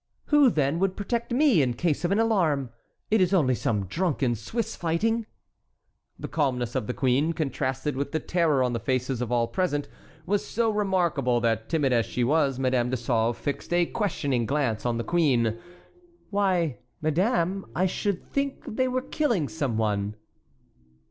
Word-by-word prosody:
"Who, 295 -3 +6
then, 150 -4 0
would 190 0 0
protect 235 +4 -2
me 255 - +4
in 125 -3 0
case 160 +4 0
of 175 - 0
an 200 - +3
alarm? 170 - +1 0.4
It 220 -2 +4
is 185 +1 +3
only 135 -8 +3
some 105 -4 -1
drunken 140 - 0
Swiss 180 - -3
fighting." 220 +7 0 0.9
The - - -6
calmness 125 -6 -1
of 105 - -2
the 125 - -2
queen, 140 +5 +2
contrasted 135 -2 -2
with 140 +1 -3
the 160 - 0
terror 155 -5 +1
on 125 -1 0
the 115 - -1
faces 130 0 -1
of 120 -1 -3
all 120 -1 +2
present, 145 -5 -1 0.4
was 205 +2 0
so 225 0 0
remarkable 175 - +1
that, 115 -1 0
timid 145 -6 +1
as 115 -2 +2
she 125 - -1
was, 140 0 +2
Madame 130 -2 +1
de 130 - -1
Sauve 115 -1 0
fixed 145 - -4
a 175 0 +3
questioning 145 - -1
glance 130 -6 0
on 120 -1 0
the 115 - -2
queen. 120 -10 +1 0.7
"Why, 185 -8 +1 0.2
madame, 180 +4 0
I 185 - +2
should 190 0 -1
think 280 -1 -1
they 255 +1 0
were 255 0 -1
killing 245 - 0
some 140 -8 -2
one." 105 -1 -1
150 Hz, 170 wpm, -26 LUFS, 125-190 Hz, 0.9 s, Who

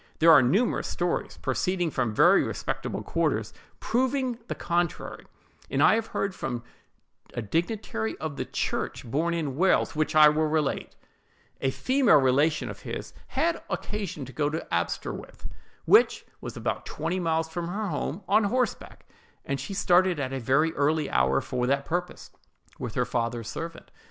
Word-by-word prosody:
There 165 +1 +6
are 150 -4 +9
numerous 195 - +1
stories, 175 0 -2
proceeding 180 -3 0
from 125 -5 0
very 105 - +5
respectable - - -3
quarters, - - -1 0.3
proving 255 0 0
the - - -3
contrary; 175 -1 -2 0.4
and 140 +2 +2
I - - +7
have 225 0 0
heard 200 - -2
two - - -16
from 120 -3 -3 0.7
a 120 - -2
dignitary 160 - -2
of 155 -2 -4
the - - -3
church, - - -3
born 160 +8 0
in 150 -6 -2
Wales, 190 -1 +2
which 155 +1 0
I 155 -1 +9
will 155 +1 +1
relate:— 155 -2 -1 0.7
A 135 - +2
female 260 - +4
relation 140 +4 +2
of - - -7
his - - -6
had 335 0 0
occasion 195 -9 -4
to 135 - -11
go 145 +3 0
to 160 +2 -4
Aberystwith, - - -3 0.4
which 435 +3 +5 0.2
was - - -7
about - - -3
twenty 165 +4 -2
miles 165 -2 0
from 170 +1 -4
her 205 +3 -3
home, 155 +4 -3
on 215 +1 +4
horseback; 250 +2 -2 0.4
and 140 0 -2
she 140 +9 -5
started 180 -2 +3
at 130 -1 -2
a 135 - -2
very 135 +7 +2
early 150 +1 +1
hour 65 +2 +3
for 125 -1 -2
that 140 +1 +1
purpose, 175 +2 -4 0.5
with 120 -3 -5
her 125 - +1
father's 115 -2 -2
servant. 165 +7 -7
160 Hz, 165 wpm, -27 LUFS, 135-185 Hz, 0.7 s, are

